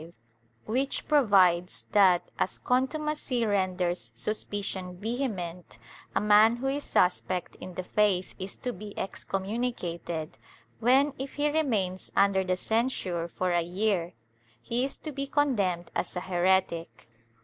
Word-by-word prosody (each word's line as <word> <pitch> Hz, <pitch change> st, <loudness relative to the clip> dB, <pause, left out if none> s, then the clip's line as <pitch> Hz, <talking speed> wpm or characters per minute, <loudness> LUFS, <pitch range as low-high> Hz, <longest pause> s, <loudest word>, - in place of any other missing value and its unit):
v) 165 Hz, +2 st, -12 dB, 0.5 s
which 265 Hz, +5 st, -1 dB
provides 190 Hz, -, +3 dB
that, 190 Hz, -4 st, +4 dB
as -, -, 0 dB
contumacy 265 Hz, -1 st, 0 dB
renders 185 Hz, -, 0 dB
suspicion 190 Hz, -, -3 dB
vehement, 200 Hz, -6 st, -4 dB, 0.4 s
a -, -, +4 dB
man 210 Hz, +2 st, +6 dB
who 245 Hz, +3 st, -6 dB
is 280 Hz, +2 st, 0 dB
suspect 180 Hz, 0 st, +1 dB
in 185 Hz, -, -9 dB
the 185 Hz, -, -3 dB
faith 190 Hz, -1 st, +1 dB
is 190 Hz, +1 st, -5 dB
to 250 Hz, -, -3 dB
be 205 Hz, +2 st, -9 dB
excommunicated, 190 Hz, -6 st, -3 dB, 0.4 s
when, 265 Hz, +5 st, +4 dB
if 270 Hz, +1 st, -5 dB
he 295 Hz, 0 st, +1 dB
remains 215 Hz, -12 st, 0 dB
under 195 Hz, -1 st, +4 dB
the 185 Hz, 0 st, 0 dB
censure 195 Hz, -6 st, -1 dB
for 180 Hz, +1 st, -2 dB
a 175 Hz, 0 st, +3 dB
year, 180 Hz, 0 st, -1 dB, 0.5 s
he 235 Hz, -, -1 dB
is 275 Hz, -, -3 dB
to 310 Hz, -, -7 dB
be 275 Hz, 0 st, -4 dB
condemned 205 Hz, -, 0 dB
as -, -, -2 dB
a 180 Hz, -, -2 dB
heretic. 180 Hz, -4 st, 0 dB
195 Hz, 135 wpm, -28 LUFS, 180-245 Hz, 0.5 s, man